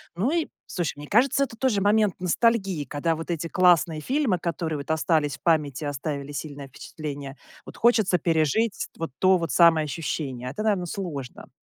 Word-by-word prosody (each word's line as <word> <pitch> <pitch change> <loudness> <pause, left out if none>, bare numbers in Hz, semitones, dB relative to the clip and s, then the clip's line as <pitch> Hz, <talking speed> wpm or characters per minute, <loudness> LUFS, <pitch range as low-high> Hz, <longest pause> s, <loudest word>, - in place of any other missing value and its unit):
Ну 220 - 0
и, 335 -2 0 0.2
слушай, 175 -5 -2
мне 145 0 -9
кажется, 265 +5 +3
это 230 -4 -5
тоже 230 -7 +1
момент 210 -1 +3
ностальгии, 190 -3 +1
когда 155 +5 -1
вот 165 +2 -5
эти 165 0 -2
классные 175 -4 +3
фильмы, 255 - 0
которые 165 -2 -3
вот 140 +2 -5
остались 155 -3 +1
в - - -41
памяти, 150 -5 +1
оставили 145 0 -4
сильное 145 -1 -7
впечатление, 140 0 -7 0.3
вот - - -11
хочется 220 -6 +3
пережить 165 +7 +1
вот 165 -4 -4
то 185 0 +5
вот 165 0 -3
самое 165 -2 +5
ощущение. 140 -4 -4
Это, 215 +11 -5
наверно, 200 -5 +1
сложно. 160 -9 -6
165 Hz, 170 wpm, -25 LUFS, 145-200 Hz, 0.3 s, то